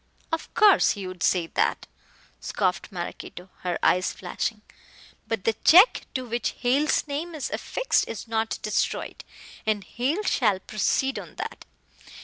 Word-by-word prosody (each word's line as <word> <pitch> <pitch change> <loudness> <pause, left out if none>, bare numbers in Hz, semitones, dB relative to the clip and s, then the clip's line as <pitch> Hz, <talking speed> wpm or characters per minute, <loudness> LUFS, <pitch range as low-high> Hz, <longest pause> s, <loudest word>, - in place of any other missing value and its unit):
"Of 325 - -3
course 420 -3 +6
he 200 -3 -6
would 185 -1 -8
say 180 -2 +2
that," - - 0 0.5
scoffed 185 0 -1
Maraquito, 180 0 -7
her 180 -1 -2
eyes 180 +1 +3
flashing, 210 +3 -4 0.6
"but 225 -4 -2
the 225 - +2
check 370 +9 +7
to 255 -1 -2
which 235 -1 -2
Hale's 270 +5 +2
name 315 +4 -4
is 295 - -4
affixed - - 0
is 230 - -6
not 225 0 -1
destroyed, 215 - -2 0.4
and 215 -2 0
Hale 280 - -2
shall 210 - +2
proceed 265 +7 0
on - - -11
that." - - -6
225 Hz, 140 wpm, -25 LUFS, 190-285 Hz, 0.6 s, check